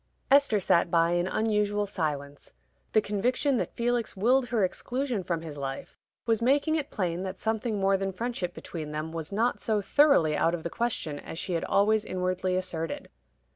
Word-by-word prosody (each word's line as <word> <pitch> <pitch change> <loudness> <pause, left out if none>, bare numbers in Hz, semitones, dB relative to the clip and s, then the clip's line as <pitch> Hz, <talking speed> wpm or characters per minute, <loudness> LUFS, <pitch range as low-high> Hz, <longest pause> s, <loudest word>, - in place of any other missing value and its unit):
Esther 280 -6 +5
sat 170 -2 +3
by 165 0 +3
in 175 +1 +1
unusual 210 0 +1
silence. 145 -7 -4 0.4
The 215 - +5
conviction 245 +7 +1
that - - -3
Felix 235 -3 -1
willed 245 +6 +3
her 225 -6 +2
exclusion 250 +3 -2
from 170 -2 -3
his 150 -3 -7
life 135 -1 -5 0.3
was 225 -1 +2
making 280 +6 +3
it 305 -3 -1
plain 180 -3 -2
that 190 0 -5
something 220 -1 -1
more 195 0 +3
than 195 0 -2
friendship 190 -3 -3
between 155 -3 -6
them 155 +1 -4
was 165 0 -5
not 230 +5 0
so 215 -2 +1
thoroughly 205 - +4
out 165 +3 +2
of 165 - -8
the 170 - -4
question 205 -11 -2
as 160 - -8
she 180 - -3
had 165 - -1
always 210 +2 +3
inwardly 185 -1 -1
asserted. 175 -3 -3
195 Hz, 180 wpm, -28 LUFS, 170-230 Hz, 0.4 s, Esther